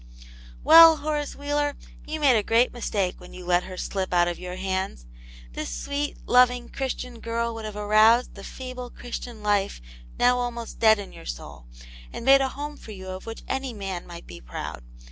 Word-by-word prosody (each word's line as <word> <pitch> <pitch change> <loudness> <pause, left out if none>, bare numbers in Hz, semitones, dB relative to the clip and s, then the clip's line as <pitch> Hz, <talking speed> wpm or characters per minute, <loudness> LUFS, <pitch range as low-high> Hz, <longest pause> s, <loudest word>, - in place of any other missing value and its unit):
Well, 325 0 +9
Horace 295 -1 -3
Wheeler, 290 0 -1 0.3
you 310 +1 -4
made 280 -5 +5
a 215 - +3
great 230 +4 +2
mistake 205 -6 -2
when 180 - -12
you 180 -1 -9
let 175 0 +2
her 185 -1 -8
slip 185 -1 -2
out 175 0 +4
of 175 - -3
your 180 0 -6
hands. 190 - -3 0.5
This - - -4
sweet, 285 - -3
loving. 250 -1 +4
Christian 250 -3 -4
girl 230 0 -2
would 225 -1 -7
have 215 -1 -6
aroused 215 +3 +4
the 200 - -11
feeble 255 0 -7
Christian 240 -2 -8
life 205 - +1 0.4
now 250 0 +4
almost 240 -1 -5
dead 220 -1 +6
in 200 -1 -8
your - - -12
soul, - - -8 0.4
and 235 - -7
made 275 +1 +7
a 270 - +2
home 290 +2 -6
for 220 - -10
you 190 -1 -9
of 185 +3 -7
which 225 - -7
any 265 -1 -3
man 195 -4 -5
might 170 0 -10
be 85 -1 -11
proud. - - -6
225 Hz, 190 wpm, -25 LUFS, 190-255 Hz, 0.5 s, Well